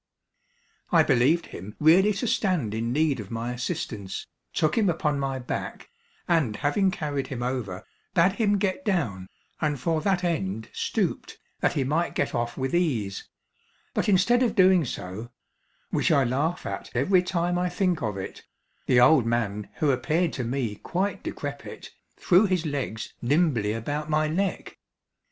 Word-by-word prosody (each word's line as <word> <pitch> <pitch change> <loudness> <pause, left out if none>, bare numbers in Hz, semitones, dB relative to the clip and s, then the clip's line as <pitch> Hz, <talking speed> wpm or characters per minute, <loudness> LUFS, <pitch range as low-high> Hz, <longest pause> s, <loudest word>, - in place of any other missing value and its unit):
I 165 -2 +6
believed 145 +5 +3
him 100 +4 -9
really 180 +7 +6
to 200 - -3
stand 180 - 0
in 115 +2 -2
need 150 -1 +1
of 100 -3 -7
my 115 +1 -3
assistance, 110 -5 -4 0.3
took 155 - +1
him 215 -4 +3
upon 150 -4 0
my 135 -1 -1
back, 125 - -5 0.4
and 155 -11 +2
having 150 - +1
carried 145 -6 -3
him 120 -3 -4
over, 115 -7 -3 0.3
bade 175 +2 +5
him 205 0 +1
get 195 +6 -1
down, 115 - -1 0.3
and 150 -3 0
for 160 +4 0
that 190 -1 +1
end 110 - -2
stooped, - - -2 0.2
that - - +1
he 140 - 0
might 155 +6 0
get - - 0
off 120 0 -2
with 130 0 -2
ease; 120 - -1 0.6
but - - 0
instead 205 +6 +4
of 245 -3 +1
doing 185 -4 +5
so 110 0 -6 0.6
(which - - +1
I 140 - +4
laugh 145 +8 -1
at 100 0 -5
every 180 +10 +4
time 175 -1 0
I 180 0 0
think 180 -2 0
of 105 -4 -2
it), 95 - -6 0.5
the 125 - +5
old 125 -1 +6
man 105 -3 -1
who 150 -2 +2
appeared 155 +7 0
to 130 - -3
me 120 -3 -2
quite 195 - -2
decrepit, - - -7 0.3
threw 185 +3 +4
his 180 -3 0
legs 135 -7 -3
nimbly 130 -6 +2
about 145 +7 -3
my 155 0 +2
neck. 190 +5 -2
150 Hz, 160 wpm, -26 LUFS, 120-175 Hz, 0.6 s, I